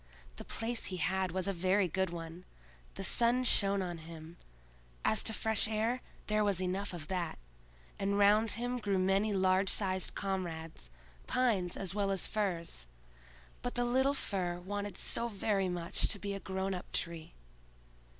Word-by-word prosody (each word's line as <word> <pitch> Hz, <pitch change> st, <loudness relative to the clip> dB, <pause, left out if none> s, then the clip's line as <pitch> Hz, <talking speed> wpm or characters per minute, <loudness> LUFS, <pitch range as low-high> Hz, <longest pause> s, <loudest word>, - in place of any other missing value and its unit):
The -, -, -6 dB
place 230 Hz, +1 st, -2 dB
he 185 Hz, -, -3 dB
had 185 Hz, +3 st, +1 dB
was 185 Hz, +2 st, 0 dB
a 195 Hz, -, +1 dB
very 185 Hz, +2 st, +2 dB
good 190 Hz, +2 st, 0 dB
one; 170 Hz, +1 st, -7 dB, 0.5 s
the -, -, -5 dB
sun 240 Hz, +2 st, +3 dB
shone 200 Hz, -5 st, +3 dB
on 175 Hz, -2 st, -4 dB
him; 160 Hz, +1 st, -10 dB, 0.7 s
as 220 Hz, -, +3 dB
to -, -, +3 dB
fresh 220 Hz, 0 st, +3 dB
air, 225 Hz, +3 st, 0 dB, 0.2 s
there 215 Hz, 0 st, +2 dB
was 200 Hz, -3 st, +2 dB
enough 185 Hz, +2 st, -1 dB
of 165 Hz, -4 st, -6 dB
that, 180 Hz, -3 st, -2 dB, 0.6 s
and 200 Hz, 0 st, +1 dB
round 210 Hz, +2 st, +5 dB
him 245 Hz, +1 st, -2 dB
grew 200 Hz, -3 st, 0 dB
many 195 Hz, +3 st, +2 dB
large 190 Hz, 0 st, +3 dB
sized 190 Hz, -2 st, +2 dB
comrades, 165 Hz, -, -3 dB, 0.4 s
pines 210 Hz, -9 st, +1 dB
as 190 Hz, -2 st, -2 dB
well 200 Hz, -1 st, 0 dB
as 195 Hz, -1 st, +1 dB
firs. 170 Hz, -, -1 dB, 0.7 s
But 245 Hz, -, -3 dB
the 245 Hz, 0 st, +1 dB
little 265 Hz, +3 st, +3 dB
Fir 180 Hz, -8 st, -1 dB
wanted 205 Hz, +2 st, -4 dB
so 235 Hz, -, +1 dB
very 200 Hz, -3 st, 0 dB
much 175 Hz, -1 st, 0 dB
to -, -, -1 dB
be 200 Hz, 0 st, -4 dB
a 195 Hz, -, -4 dB
grown 190 Hz, +1 st, -2 dB
up 180 Hz, -, -6 dB
tree. 170 Hz, -2 st, -3 dB
195 Hz, 165 wpm, -33 LUFS, 180-210 Hz, 0.7 s, round